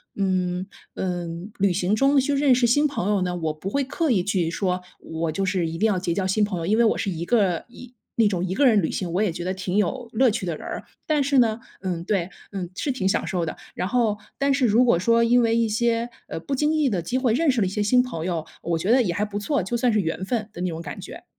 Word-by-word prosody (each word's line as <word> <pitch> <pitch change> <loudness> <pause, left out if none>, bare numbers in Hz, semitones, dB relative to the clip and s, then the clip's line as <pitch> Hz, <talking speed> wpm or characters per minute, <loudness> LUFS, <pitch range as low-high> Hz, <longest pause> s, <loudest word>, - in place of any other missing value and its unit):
嗯， 185 -2 0 0.3
嗯， 175 +1 -4
旅 195 -2 +3
行 185 +2 0
中 275 +3 +3
去 285 +2 0
认 280 -2 +4
识 245 0 +3
新 290 +6 +3
朋 240 -9 -2
友 205 -2 +2
呢， 180 -1 -2
我 160 -3 -2
不 170 +5 -6
会 280 +7 0
刻 290 +4 -1
意 190 -7 +2
去 180 -4 0
说， 180 +1 -1 0.2
我 160 0 -3
就 195 - -1
是 185 -3 0
一 165 +1 -5
定 220 - +1
要 195 -4 +1
结 175 -2 -1
交 190 +1 -1
新 195 +3 +2
朋 190 -4 -4
友， 165 - -3
因 215 +5 +2
为 235 - +5
我 - - +2
是 - - -1
一 170 -1 -4
个 195 -6 +1
一 245 0 -13 0.2
那 230 - +4
种 185 -2 -1
一 185 - -2
个 285 - +3
人 220 -6 +5
旅 160 - -1
行， 180 -3 -3
我 180 +4 0
也 210 -5 +2
觉 175 - -5
得 185 +1 -1
挺 185 0 -4
有 245 +3 0
乐 250 0 +4
趣 200 -4 -3
的 170 - -2
人 - - -10
儿， - - -5 0.2
但 305 -2 +2
是 275 -1 +3
呢 225 -2 +2 0.2
嗯， 180 -3 -3
对， 190 -4 0 0.2
嗯， 185 -3 -4
是 285 - -2
挺 200 -7 -1
享 - - 0
受 175 -3 -1
的， 160 - -5 0.2
然 180 - -2
后 225 -3 +1 0.2
但 275 0 +2
是 270 -2 +2
如 235 +3 +4
果 235 - +4
说 230 +5 +3
因 245 +1 +4
为 230 0 +2
一 230 -1 +2
些， 230 +2 0 0.2
呃， - - -5
不 275 +11 -3
经 300 +3 +1
意 305 -3 +2
的 190 -6 -1
机 240 +10 -2
会 255 -4 +2
认 305 +3 +3
识 250 - -1
了 190 - +2
一 - - -2
些 205 +1 -1
新 250 +4 +4
朋 210 -11 -4
友， 170 -3 -2 0.2
我 170 -1 -1
觉 190 +7 0
得 260 - +5
也 175 -6 -1
还 205 +4 0
不 205 -1 -5
错， 220 +3 0
就 195 +7 -3
算 240 0 +2
是 215 - +2
缘 165 +1 -3
分 220 0 -2
的 175 - -7
那 180 - 0
种 165 0 -5
感 150 -3 -7
觉。 - - -10
205 Hz, 305 characters per minute, -24 LUFS, 180-240 Hz, 0.3 s, 为